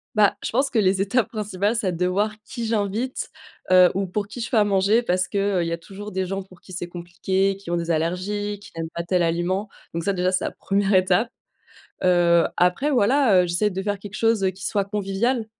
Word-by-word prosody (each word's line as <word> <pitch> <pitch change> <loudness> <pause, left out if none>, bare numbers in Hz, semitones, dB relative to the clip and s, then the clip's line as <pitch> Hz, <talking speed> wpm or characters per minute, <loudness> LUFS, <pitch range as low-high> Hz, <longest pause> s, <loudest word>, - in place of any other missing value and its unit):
Bah, 210 -2 +4
je - - -2
pense 270 +4 +1
que 235 - +2
les 190 -1 +2
étapes 205 +3 +1
principales, 210 0 -1
c'est 190 -6 -1
de 180 +2 0
voir 205 +4 0
qui 235 +2 -6
j'invite, 220 +3 -2 0.4
heu, 180 -1 +7
ou 195 +1 -1
pour 200 +2 -3
qui 235 +3 -7
je 235 - -4
fais 240 - +1
à 210 - +6
manger. 205 +3 +2
Parce 185 -3 0
que, 205 - -4 0.2
heu, 170 - +1
il - - -2
y 165 - -3
a 170 - -1
toujours 205 +4 -9
des 190 0 -1
gens 195 +1 -3
pour 185 -1 -16
qui 185 - -13
c'est 175 -1 -4
compliqué, 185 +3 -1
qui 195 -3 -11
ont 175 - 0
des 170 0 -2
allergies, 195 +6 -2
qui 205 - -14
n'aiment 165 -1 -4
pas 170 - -2
tel 180 +1 +1
aliment. 175 +4 0 0.2
Donc 170 0 -3
ça, 200 +3 +1
déjà, 180 0 +1
c'est 185 - 0
la - - -2
1re 200 0 0
étape. 185 +5 +3 0.7
Heu, 175 -2 +4
après, 180 +11 +2
voilà, 245 -5 +4
heu, 180 - -2
j'essaie 175 +5 +1
de 190 0 -4
faire 205 -1 -2
quelque 205 0 -9
chose, 225 -3 +2
heu, 190 - +3
qui 190 +1 -8
soit 200 -1 0
convivial. 210 +4 -1
195 Hz, 240 wpm, -23 LUFS, 180-210 Hz, 0.7 s, heu